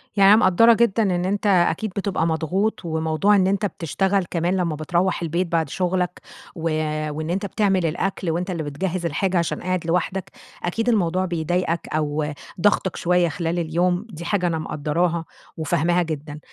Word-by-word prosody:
يعني 200 0 +7
أنا - - +8
مقدرة 230 +3 +5
جدًا 225 -1 +2
إن 180 -2 0
أنتَ 200 +2 -1
أكيد 190 +2 +2
بتبقى 195 -5 0
مضغوط، 175 +6 -1
وموضوع 160 +5 +2
إن 190 -1 +3
أنتَ 200 +2 +1
بتشتغل 190 +2 0
كمان 175 +2 0
لما 170 -4 0
بترَوّح 175 +4 0
البيت 170 +2 -1
بعد 165 -4 0
شغلَك 180 0 -1 0.3
و 165 - -8 0.5
وإن 155 +2 -4
أنتَ 195 +3 -1
بتعمل 195 -3 +1
الأكل 175 +2 -2
وأنتَ 180 +3 -2
اللي 165 -3 -3
بتجهز 175 +4 -3
الحاجة 180 +4 0
عشان 170 - -1
قاعد 185 -2 -2
لوحدك، 180 +2 -1 0.3
أكيد 225 +7 -1
الموضوع 185 -4 +1
بيضايقَك 170 0 -1
أو 150 -1 -1 0.3
ضاغطَك 205 -3 +2
شوية 175 -1 +2
خلال 170 0 -2
اليوم، 175 +4 0
دي 170 -2 -8
حاجة 180 -2 +1
أنا 165 -2 -1
مقدراها 165 +2 -1 0.3
وفاهماها 170 +2 +1
جدًا. 150 -2 -6
175 Hz, 165 wpm, -22 LUFS, 165-190 Hz, 0.5 s, أنا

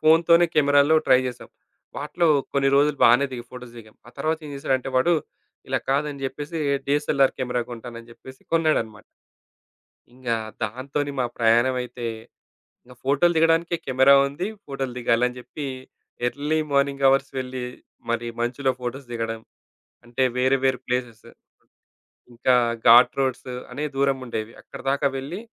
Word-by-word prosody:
ఫోనుతోనే 170 +2 +5
కెమెరాలో 145 +1 +4
ట్రై 130 - +6
చేసాం. 125 -1 -7 0.5
వాటిలో 150 +4 -1 0.3
కొన్ని 135 -1 +2
రోజులు 145 0 +3
బానే 125 +4 +5
దిగి 120 -1 -6
ఫోటోస్ 125 -1 -11
దిగాం. 110 -1 -15
ఆ - - -13
తరువాత 155 +3 0
ఏం - - -8
చేసాడంటే 135 -2 -1
వాడు 170 +7 +3 0.6
ఇలా - - +1
కాదని 140 0 -1
జెప్పేసి, 150 +4 -5 0.3
డీఎస్ఎల్ఆర్ 140 -1 +2
కెమెరా 125 -1 -1
కొంటానని 115 0 -9
చెప్పేసి 130 +2 -14
కొన్నాడనమాట. 155 -10 0 1.1
ఇంగా 125 -2 -2 0.3
దాంతోనే 140 +6 -3
మా 125 - +2
ప్రయాణమయితే, 120 +1 +1 0.8
ఇంక 125 +1 -16
ఫోటోలు 145 +6 +3
దిగడానికే 165 +1 +3
కెమెరా 130 +1 +5
ఉంది. 155 +7 -4 0.2
ఫోటోలు 135 -3 -4
దిగాలని 125 +1 +1
జెప్పి 140 +3 -7 0.6
ఎర్లీ 150 +4 -1
మార్నింగ్ 140 0 +1
అవర్స్ 135 0 +2
వెళ్లి 130 -1 -5 0.5
మరి 120 0 -1
మంచులో 130 +3 0
ఫోటోస్ 125 +2 -5
దిగడం. 115 -1 -4 0.6
అంటే 120 +2 -3
వేరు, 130 +2 +3
వేరు 130 -1 +2
ప్లేసెస్. 125 -3 -3 1.1
ఇంకా 125 +2 +2 0.3
ఘాట్ 120 +3 +7
రోడ్స్ 130 -1 -1 0.2
అనే 145 +4 -4
దూరం 135 0 +1
ఉండేవి. 110 -2 -5
అక్కడిదాకా 140 +1 -1
వెళ్లి 145 +9 -6
135 Hz, 130 wpm, -23 LUFS, 125-145 Hz, 1.1 s, ఘాట్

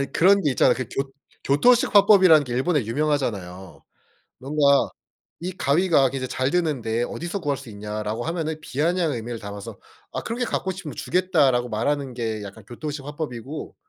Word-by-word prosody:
아니 140 - -3
그런 200 +4 +5
게 145 - +2
있잖아. 130 - +4
그 130 - -3
교 135 0 -2 0.3
교토식 220 - +3
화법이라는 190 -7 +7
게 125 - -6
일본에 135 +1 +1
유명하잖아요. 110 - -2 0.6
뭔가 140 +1 +3 0.5
"이 180 +2 -4
가위가 150 -4 +3
굉장히 130 -1 -4
잘 130 +2 -1
드는데 130 -10 0
어디서 175 +9 -4
구할 145 -5 -1
수 135 -3 -11
있냐?"라고 105 +2 -4
하면은 160 -1 -3
비아냥 160 +3 0
의미를 115 0 -5
담아서 100 -1 -8 0.3
"아 - - -4
그렇게 240 +2 -3
갖고 190 - -2
싶으면 185 -5 -8
주겠다."라고 145 -10 +1
말하는 135 +4 -1
게 110 -3 -3
약간 100 +1 -11
교토식 140 +4 -6
화법이고 145 -2 -6
140 Hz, 390 characters per minute, -23 LUFS, 120-165 Hz, 0.6 s, 화법이라는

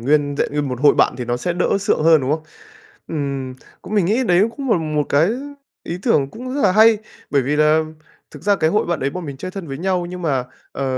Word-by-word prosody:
nguyên 145 +3 +1
hẹn - - +1
nguyên 145 -2 -1
một 125 0 -4
hội 145 -1 +5
bạn - - +3
thì 125 - -3
nó 120 +1 -1
sẽ 175 +8 -2
đỡ 180 +3 +1
sượng 200 -6 +1
hơn, 160 -2 +5
đúng 130 +2 -2
không? 155 +1 0 0.7
Ừm, 140 -4 -3 0.3
cũng 210 - -8
mình 200 -5 +3
nghĩ 230 +7 +1
đấy 180 -2 +4
cũng 270 -3 -4
là 195 - +4
một 155 -2 -1
cái 155 +7 +3 0.5
ý 170 - -4
tưởng 140 - +2
cũng 255 +3 -7
rất 285 - -1
là - - +4
hay, 220 +2 +6 0.3
bởi 140 -2 +2
vì 145 +4 -1
là 155 +1 +4 0.5
thực - - -12
ra 205 0 +3
cái 160 -3 +1
hội 210 - +1
bạn 170 -3 -1
đấy 135 - 0
bọn 180 +3 -6
mình 140 -2 -7
chơi 185 - -6
thân 190 -5 -7
với 135 0 -5
nhau 180 0 -1
nhưng 180 +1 -7
mà, 135 -6 0 0.3
ờ, 140 - -4
160 Hz, 255 wpm, -20 LUFS, 140-185 Hz, 0.7 s, hay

